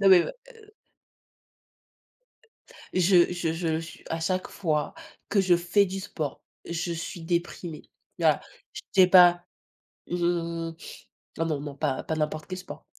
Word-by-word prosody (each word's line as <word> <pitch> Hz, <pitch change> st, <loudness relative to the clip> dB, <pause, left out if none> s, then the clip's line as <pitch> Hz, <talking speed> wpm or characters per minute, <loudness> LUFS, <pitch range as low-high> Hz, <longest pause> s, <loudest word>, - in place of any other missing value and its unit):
non 195 Hz, -, +5 dB
mais 185 Hz, -2 st, +9 dB
m -, -, -4 dB, 0.3 s
heu 430 Hz, -2 st, -18 dB, 2.2 s
Je 180 Hz, -1 st, +5 dB
je 175 Hz, -2 st, -1 dB
je 165 Hz, -1 st, -1 dB
su 165 Hz, -, -10 dB
à 165 Hz, -, -2 dB
chaque 185 Hz, +3 st, -1 dB
fois 155 Hz, -6 st, -1 dB, 0.4 s
que 200 Hz, -1 st, +3 dB
je 180 Hz, -2 st, +4 dB
fais 175 Hz, +4 st, +3 dB
du 195 Hz, +1 st, -4 dB
sport, 155 Hz, -6 st, -5 dB, 0.2 s
je 170 Hz, 0 st, -3 dB
suis 170 Hz, +1 st, -6 dB
déprimée, 170 Hz, -1 st, -3 dB, 0.4 s
voilà. -, -, +3 dB, 0.3 s
Je -, -, -7 dB
sais 185 Hz, -2 st, +6 dB
pas, 175 Hz, -1 st, +7 dB, 0.7 s
mmh 170 Hz, -1 st, -1 dB, 0.7 s
ah 165 Hz, -, +1 dB
non, 155 Hz, -3 st, -1 dB
non, 145 Hz, -1 st, -6 dB
pas 130 Hz, -, -1 dB
pas 160 Hz, -, -3 dB
n'importe 155 Hz, 0 st, -2 dB
quel 185 Hz, 0 st, -5 dB
sport. 185 Hz, -, -10 dB
175 Hz, 150 wpm, -27 LUFS, 160-185 Hz, 2.2 s, mais